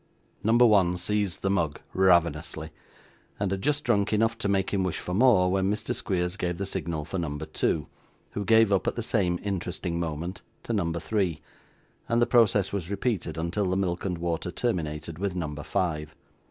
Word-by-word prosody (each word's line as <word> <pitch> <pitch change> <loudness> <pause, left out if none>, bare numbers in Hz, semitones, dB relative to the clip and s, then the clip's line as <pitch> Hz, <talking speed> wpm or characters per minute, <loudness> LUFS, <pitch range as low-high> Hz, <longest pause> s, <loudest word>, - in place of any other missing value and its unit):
Number 115 +3 +5
one 95 -5 +4
seized 100 0 -1
the 95 - +2
mug 80 -6 0
ravenously, 85 -4 +2 0.7
and 100 -2 0
had 95 -1 -2
just 145 +4 +1
drunk 105 -3 +2
enough 115 +1 +2
to 100 - -1
make 95 -1 +1
him 100 - +1
wish 90 -3 -1
for 90 - -5
more, 100 -4 +5
when 95 +1 +1
Mr. 105 - -2
Squeers 90 -1 -2
gave 90 -2 -2
the 100 - -2
signal 85 -5 -3
for 90 +4 -3
number 75 -2 -3
two, 80 -1 0 0.5
who 105 - -3
gave 110 -1 +5
up 95 - +1
at - - 0
the 120 - -3
same 95 -6 +1
interesting 90 -3 -3
moment 85 +3 -4 0.2
to 115 - -3
number 85 -5 0
three; 90 -2 -1 0.7
and 115 - +3
the 120 - +5
process 110 -6 +3
was 95 -4 -3
repeated 100 -6 -2
until 90 +4 -1
the 95 - +1
milk 90 -2 -1
and 90 -3 -2
water 85 +1 -2
terminated 80 -7 -3
with 100 -2 -2
number 75 -4 -3
five. 75 -1 -2
95 Hz, 185 wpm, -27 LUFS, 85-100 Hz, 0.7 s, Number